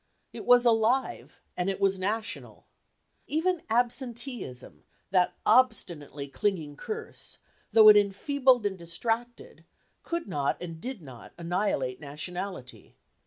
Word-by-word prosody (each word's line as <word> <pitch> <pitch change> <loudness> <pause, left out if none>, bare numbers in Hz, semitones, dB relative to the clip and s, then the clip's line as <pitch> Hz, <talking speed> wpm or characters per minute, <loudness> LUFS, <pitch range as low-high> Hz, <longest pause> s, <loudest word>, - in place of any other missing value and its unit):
It - - -8
was 245 0 +6
alive, 235 +3 +1
and 180 +2 -1
it 195 - -3
was 195 -1 +2
national. 215 +5 -4 0.6
Even 335 +3 0
absenteeism, 240 - -3 0.3
that 180 -2 +2
obstinately 165 - +2
clinging 160 -2 -2
curse, 435 - -7 0.3
though 220 -1 +8
it 210 - +10
enfeebled 250 +4 +2
and 190 -2 -2
distracted, 225 +8 -4 0.4
could 340 -5 -4
not, 145 -7 -1
and 165 -2 -8
did 250 -6 -6
not, 125 -6 -12
annihilate 170 -7 -1
nationality. 160 0 -7
200 Hz, 115 wpm, -28 LUFS, 170-245 Hz, 0.6 s, it